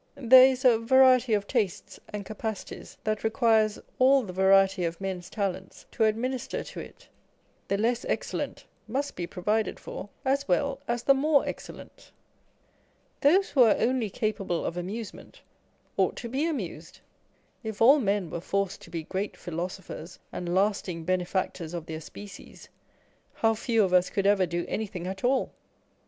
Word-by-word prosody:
There 260 0 +8
is 260 0 -2
a 235 -3 +6
variety 255 -1 +5
of 205 -1 -1
tastes 210 -6 -2
and 205 -1 -6
capacities 215 0 -6
that 215 0 -2
requires 220 -2 +2 0.2
all 265 +1 +5
the 185 -4 -7
variety 190 0 +4
of 170 0 -2
men's 190 -2 -5
talents 190 -2 -4
to 225 - +2
administer 245 +4 -2
to - - -9
it. - - -11 0.6
The 200 - 0
less 235 +3 0
excellent - - -3 0.2
must 275 +5 -2
be 175 -1 -4
provided 210 +4 -1
for 205 - -8 0.2
as 275 +1 +1
well 280 -2 +1
as 240 0 -1
the 275 - +6
more 285 +1 +3
excellent. - - -9 1.1
Those 370 +7 +4
who 270 - +4
are 225 -3 +6
only 240 -3 +1
capable 195 -5 -2
of - - -3
amusement 195 +5 -7 0.5
ought - - +2
to 235 - -6
be 275 +6 0
amused. 180 - -5 0.6
If 220 -2 -5
all 270 +6 +7
men 200 - 0
were 170 - -4
forced 195 +1 -2
to - - -13
be 165 -1 -4
great 195 +5 -4
philosophers 175 0 -6
and 175 0 -3
lasting 190 -4 0
bene 185 0 +1
factors 175 -2 -3
of 170 -2 -5
their 160 -1 -6
species, 205 +5 -12 0.7
how 225 0 +2
few 225 0 +1
of 185 -2 0
us 180 0 +4
could 195 - -1
ever 200 -2 +4
do 170 0 -2
any 220 0 -2
thing 180 -4 -7
at 190 +1 -5
all 255 +1 +1
210 Hz, 165 wpm, -27 LUFS, 185-245 Hz, 1.1 s, There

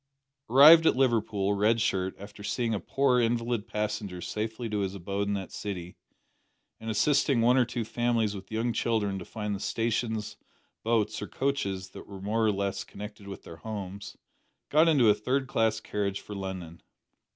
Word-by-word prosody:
Arrived 155 +6 +9
at - - +4
Liverpool, 110 -6 +1
Red 105 +3 +2
Shirt, 95 -4 0
after 100 +1 -11
seeing 115 +3 -1
a 105 - -1
poor 135 +1 +2
invalid 115 -1 0
passenger 105 -3 -3
safely 110 +6 -4
to 105 -1 -2
his 95 -1 -2
abode 100 +2 -3
in 100 - 0
that 95 -2 -5
city, 90 -4 -6 0.8
and 110 - -6
assisting 140 +3 +2
one 120 +2 +4
or 130 -2 +4
two 120 0 -3
families 115 -2 0
with 95 0 -9
young 115 +2 0
children 105 -5 0
to 90 - -8
find 105 -2 -4
the 100 - -3
stations, 110 -1 -2 0.4
boats, 110 -3 0
or 105 - -4
coaches 100 -9 -2
that - - -11
were 100 -1 -9
more 105 +4 0
or 110 - +4
less 100 -1 -2
connected 105 0 -10
with 100 - -8
their 80 - -10
homes, 100 -1 -7 0.5
got 155 +3 +5
into 140 -8 +5
a 105 - +7
third 130 +6 -1
class 110 -3 +1
carriage 100 -3 -2
for 105 - -9
London. 95 -4 -6
105 Hz, 175 wpm, -28 LUFS, 100-120 Hz, 0.8 s, Arrived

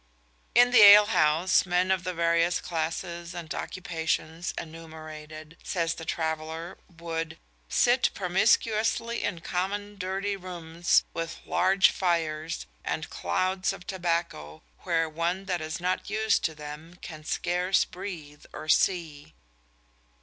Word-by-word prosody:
In 245 0 +6
the 245 -3 +7
ale 205 0 +10
house 160 0 +3
men 185 +1 +1
of 190 -2 +1
the 185 0 -3
various 170 +1 +2
classes 170 +1 -4
and 165 -2 -5
occupations 165 -1 -3
enumerated, 155 -1 -9
says 170 -3 -1
the 165 - -9
traveller, 160 +1 -3 0.2
would 165 -1 -4 0.3
"sit 245 - +3
promiscuously 220 +4 +1
in 170 - -2
common 200 +4 -3
dirty 195 +2 -2
rooms, 175 -2 0
with 165 0 -4
large 190 +1 +4
fires, 165 -3 -1 0.2
and 160 - -3
clouds 185 0 0
of 180 - -11
tobacco, 170 - -3 0.2
where 165 -1 0
one 170 +4 -2
that 180 -4 -2
is 155 +2 -4
not 180 +3 -2
used 220 0 +1
to 160 - -1
them 150 +3 -9
can 155 -2 -8
scarce 180 +4 +1
breathe 155 -6 -8
or - - -8
see." 160 - +1
170 Hz, 125 wpm, -27 LUFS, 160-185 Hz, 0.3 s, ale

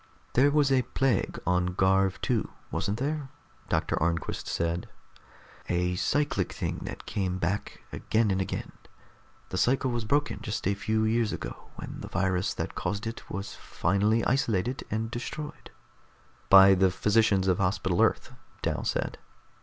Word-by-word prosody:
"There 135 +4 +5
was 145 -2 +3
a 130 -1 +4
plague 125 -2 0
on 90 0 +1
Garv 95 0 +3
II, - - +1 0.3
wasn't 100 +2 -1
there?" 145 +2 -2 0.4
Doctor - - 0
Arnquist 85 +1 -1
said. 85 +1 -2 0.8
"A 90 0 +1
cyclic 145 +9 0
thing - - -3
that - - -7
came 95 -2 -2
back 95 +3 -3
again 110 -2 +1
and 95 0 +1
again. 95 - -4 0.8
The 95 - -2
cycle 130 +1 +2
was 120 -2 -2
broken 145 +6 +1
just 105 -3 -3
a 100 - +3
few 110 +2 0
years 110 -1 +1
ago, - - -7
when - - -7
the - - -7
virus 95 0 0
that - - -3
caused 105 +2 -3
it 115 +1 -6
was 100 +2 -5
finally 105 +5 +1
isolated 125 -1 0
and 110 +1 -2
destroyed." 150 +5 -6 0.8
"By 95 0 +9
the 95 0 +4
physicians 105 0 +2
of 90 -2 +2
Hospital 95 -2 +1
Earth," - - +1 0.3
Dal - - -1
said. - - -2
105 Hz, 150 wpm, -28 LUFS, 95-120 Hz, 0.8 s, By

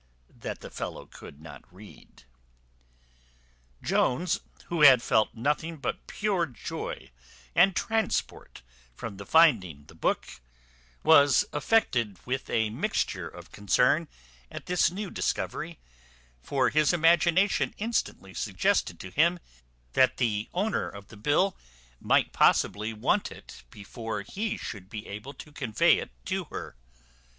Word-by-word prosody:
that - - -6
the - - -9
fellow - - -6
could 70 - -13
not 75 -3 -11
read. 100 -5 -16 1.6
Jones, 155 +7 +1 0.3
who 170 -2 -2
had 135 -4 +9
felt 110 -1 +2
nothing 150 +7 -1
but 140 - -4
pure 195 -5 0
joy 125 - -7 0.4
and 180 +2 +5
transport 220 - -2 0.3
from 105 - -7
the 100 0 -9
finding 95 - +4
the - - -16
book, - - -2 0.6
was 145 -5 +6
affected 125 - +1
with 130 +1 -3
a 110 -1 +1
mixture - - -2
of - - -12
concern 125 - +2 0.4
at - - -8
this 180 -1 +2
new 195 +2 -6
discovery; - - -3 0.6
for 130 - +1
his 155 +2 +3
imagination 175 +3 +3
instantly 210 - -3
suggested 95 -2 0
to 95 - -8
him 170 - +3 0.6
that 130 - +4
the 110 -3 -1
owner 205 +4 -1
of 100 0 -12
the 110 - -12
bill 150 - +1 0.4
might - - +2
possibly 110 +2 +2
want 110 -1 0
it - - -12
before 105 - -6
he 210 - -3
should 100 -4 -8
be 105 -1 -7
able 105 +8 -8
to 150 - -12
convey 130 -7 +2
it - - -6 0.2
to - - -2
her. - - -8
130 Hz, 130 wpm, -28 LUFS, 105-170 Hz, 1.6 s, had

